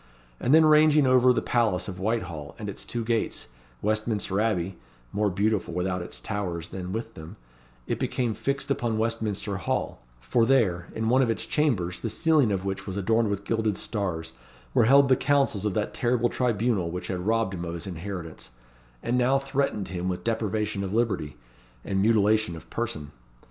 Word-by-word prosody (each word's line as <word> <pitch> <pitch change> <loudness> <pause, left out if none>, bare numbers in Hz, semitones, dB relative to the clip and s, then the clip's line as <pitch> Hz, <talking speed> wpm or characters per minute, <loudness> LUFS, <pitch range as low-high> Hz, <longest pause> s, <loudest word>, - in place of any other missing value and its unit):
and 125 - 0
then 160 +1 +7
ranging 150 -1 +6
over 130 0 +5
the 125 - 0
palace 115 -7 +1
of 90 -2 -6
Whitehall 90 -8 -3
and 105 - -6
its 100 - -6
two 120 -1 -3
gates, 115 - -1 0.3
Westminster 105 -2 0
Abbey 95 -5 -1 0.3
more 105 0 +1
beautiful 100 -2 0
without 90 0 -1
its 85 - -6
towers 90 -6 -4
than 95 -1 -6
with 115 +2 -4
them 80 +5 -10 0.5
it - - -2
became 120 -3 -1
fixed 140 +4 -2
upon 120 -4 0
Westminster 110 -3 -1
Hall; 90 - -2 0.2
for 115 - +1
there, 110 -9 +2
in 110 0 -1
one 130 +2 +4
of 125 - +2
its 115 - 0
chambers, 90 - 0
the 115 - -2
ceiling 150 -1 +3
of 95 -1 -2
which 95 +1 -4
was 95 0 -4
adorned 110 +2 +2
with 100 0 -2
gilded 110 -1 0
stars, 90 -7 -3 0.4
were 115 - +4
held 140 +3 +6
the 130 - +5
councils 135 -7 +1
of 100 - -2
that 105 - -1
terrible 120 -1 +1
tribunal 115 -7 0
which 90 +1 -5
had 95 - -2
robbed 115 -3 +1
him 85 -2 -4
of 85 0 -4
his 85 - -5
inheritance, 90 -5 -6 0.5
and 125 +1 +1
now 130 +2 +3
threatened 135 -6 -1
him 90 0 -3
with 90 - -3
deprivation 110 -2 -1
of 100 +2 -3
liberty, 100 - 0 0.5
and 95 -1 0
mutilation 110 -3 +3
of 80 - -11
person. 110 -12 -4
110 Hz, 180 wpm, -26 LUFS, 95-120 Hz, 0.5 s, then